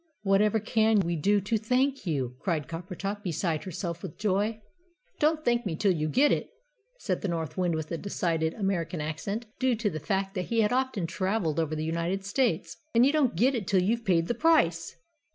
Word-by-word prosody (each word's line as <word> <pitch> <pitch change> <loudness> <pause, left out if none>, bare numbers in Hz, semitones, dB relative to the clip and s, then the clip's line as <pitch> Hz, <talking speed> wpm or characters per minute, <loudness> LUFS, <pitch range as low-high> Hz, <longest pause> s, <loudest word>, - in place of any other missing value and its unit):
"Whatever 205 +2 +3
CAN 220 0 +3
we 170 -1 -1
do 200 +7 +2
to 210 +3 0
thank 255 +2 0
you?" 130 -6 -1
cried 165 -7 -1
Coppertop, 185 +4 -5
beside 170 -3 -2
herself 170 -2 -4
with - - -8
joy. 210 +2 0 0.6
"Don't 310 +1 +2
thank 240 0 +2
me 185 -7 -2
till 195 +4 +2
you 155 -3 -1
get 280 - +4
it," - - 0 0.5
said - - -2
the 205 - -2
North 160 -3 -3
Wind, 175 -3 0
with 160 -1 -4
a 165 - -2
decided 165 -5 -1
American 185 -5 -1
accent, 165 +9 -3
due 260 -2 +2
to 215 -2 -1
the 155 - -4
fact 195 +5 -1
that 185 -3 -2
he 230 -1 +1
had 210 +2 +2
often 255 -8 0
travelled 185 -2 -1
over 155 -1 -1
the 155 0 -3
United 170 +4 -2
States. 200 -7 0 0.2
"And 235 +2 +6
you 280 - +4
don't 290 - +2
get 250 +10 +3
it 220 -7 -3
till 185 -1 +3
you've 230 +5 0
paid 170 -5 +2
the - - +1
price!" 210 - +2
195 Hz, 205 wpm, -28 LUFS, 165-225 Hz, 0.6 s, And